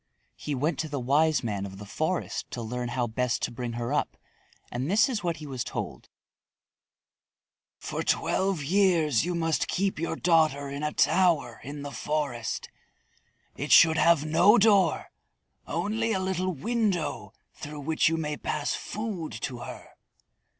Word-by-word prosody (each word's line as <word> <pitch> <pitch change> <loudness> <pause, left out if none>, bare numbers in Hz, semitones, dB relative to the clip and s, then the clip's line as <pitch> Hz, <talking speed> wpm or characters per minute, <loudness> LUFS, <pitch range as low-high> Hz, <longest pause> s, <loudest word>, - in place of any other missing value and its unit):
He 150 - -4
went 150 +6 -1
to 160 - -2
the 145 -1 -3
Wise 145 +5 +2
Man 105 -4 -2
of 95 -1 -7
the 105 - -9
Forest 160 - -2
to 120 - -5
learn 120 +2 -3
how 120 0 -1
best 120 +2 -1
to - - -1
bring 120 0 -5
her 120 +3 -3
up, 150 - -1 0.5
and 125 +5 -3
this 210 +7 +4
is 230 -7 -3
what 170 -2 -1
he 155 - -9
was 130 -4 -4
told: - - -6 1.7
"For - - -4
twelve 190 -5 0
years 165 - +3
you 175 0 -2
must 165 -2 0
keep 195 -1 -1
your 165 - -2
daughter 155 -5 +2
in 140 +1 -5
a 150 0 -1
tower 170 -12 +2
in 145 +2 -7
the 145 - -6
forest. 140 -7 -3 0.9
It 145 +3 -4
should 160 -1 +7
have 165 -3 +4
no 175 +8 +5
door, 205 -3 +3 0.6
only 225 +2 -1
a 190 - 0
little 185 0 -1
window 205 - -1 0.2
through 150 0 -8
which 160 +2 +2
you 165 - 0
may 150 -2 -3
pass 150 - -2
food 205 - -4
to 125 -2 -4
her. - - -9
155 Hz, 160 wpm, -27 LUFS, 135-180 Hz, 1.7 s, should